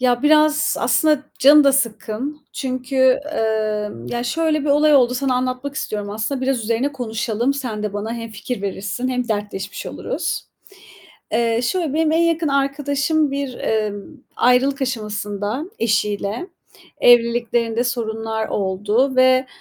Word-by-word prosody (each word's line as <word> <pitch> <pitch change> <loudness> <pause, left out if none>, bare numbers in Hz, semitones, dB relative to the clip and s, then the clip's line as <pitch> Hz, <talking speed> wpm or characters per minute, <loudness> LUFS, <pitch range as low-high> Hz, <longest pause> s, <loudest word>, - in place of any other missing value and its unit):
Ya 245 -1 +2
biraz 305 0 +4
aslında 305 -3 +2 0.2
canım 290 +2 +7
da 275 - +5
sıkkın. 260 +3 -2
Çünkü, 255 0 -4 0.4
emm, 215 - -2
ya 240 - -3
şöyle 315 +4 0
bir 290 - -4
olay 300 +1 +4
oldu, 250 -2 +4
sana 265 0 0
anlatmak 255 +2 -2
istiyorum 210 -8 -4
aslında. 220 +6 -3
Biraz 265 0 0
üzerine 235 +6 0
konuşalım, 235 0 -2
sen 245 -6 -4
de 210 -1 -3
bana 205 +2 -4
hem 230 -1 -6
fikir 220 +1 -5
verirsin 200 +5 -3
hem 250 -1 -2
dertleşmiş 205 -2 -4
oluruz. - - -3 0.9
Eee, 230 0 +1
şöyle, 305 +3 -1
benim 315 -1 +2
en 325 - +3
yakın 335 -1 +1
arkadaşım 280 +2 0
bir, 275 -2 -4 0.3
ımm, 205 +8 -10
ayrılık 265 +3 +3
aşamasında 210 0 -3
eşiyle. 210 - -1 0.5
Evliliklerinde 235 -1 +3
sorunlar 225 -2 -2
oldu 210 +7 0
ve, 255 0 +4
250 Hz, 135 wpm, -20 LUFS, 220-280 Hz, 0.9 s, canım